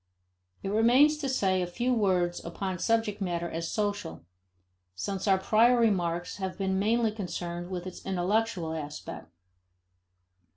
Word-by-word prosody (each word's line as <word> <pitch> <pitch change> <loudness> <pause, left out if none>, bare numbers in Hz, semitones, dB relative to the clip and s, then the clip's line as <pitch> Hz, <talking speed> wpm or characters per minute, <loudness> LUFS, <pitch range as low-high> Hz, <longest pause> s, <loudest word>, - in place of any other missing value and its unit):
It 195 - -2
remains 245 +8 +5
to 280 -3 -2
say 190 -7 +1
a 180 - -1
few 240 +8 0
words 185 -6 +1
upon 185 +2 -4
subject 225 -1 0
matter 175 -2 -1
as 165 0 -4
social, 205 - -3 0.7
since 195 - -3
our 195 -1 +5
prior 225 +6 +4
remarks 175 -6 +1
have 190 -2 -4
been 190 -1 0
mainly 225 +2 +2
concerned 175 -4 -5
with 180 -1 -4
its 185 - -8
intellectual 190 -2 0
aspect. 150 - -7
190 Hz, 135 wpm, -29 LUFS, 175-220 Hz, 0.7 s, remains